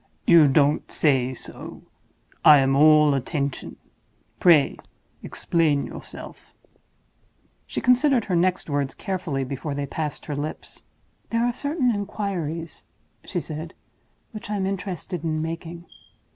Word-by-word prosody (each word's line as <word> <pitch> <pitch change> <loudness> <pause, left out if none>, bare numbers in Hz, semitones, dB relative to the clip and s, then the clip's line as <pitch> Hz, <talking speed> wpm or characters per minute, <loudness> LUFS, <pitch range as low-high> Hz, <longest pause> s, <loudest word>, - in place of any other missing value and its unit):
"You 165 -3 +7
don't 145 +1 +2
say 130 -4 +2
so! - - -9 0.6
I 150 - +9
am 135 0 +2
all 150 0 +6
attention; 140 0 -3 0.6
pray 165 -6 +5 0.4
explain 155 -4 0
yourself!" - - -10 1.1
She - - -4
considered 250 -1 +3
her 185 - -1
next 180 +2 +1
words 145 -2 -2
carefully 175 -8 -3
before 140 +2 -5
they 140 0 -2
passed 150 0 -5
her 150 - -4
lips. 145 +2 -6 0.5
"There 230 +1 +1
are 245 - 0
certain 285 -2 0
inquiries," 175 -6 -4 0.4
she - - -2
said, 160 +2 -7 0.6
"which 215 -2 -9
I 210 - -1
am 195 -2 -1
interested 185 -3 -4
in 155 -1 -1
making. 165 +1 -6
160 Hz, 125 wpm, -24 LUFS, 145-190 Hz, 1.1 s, I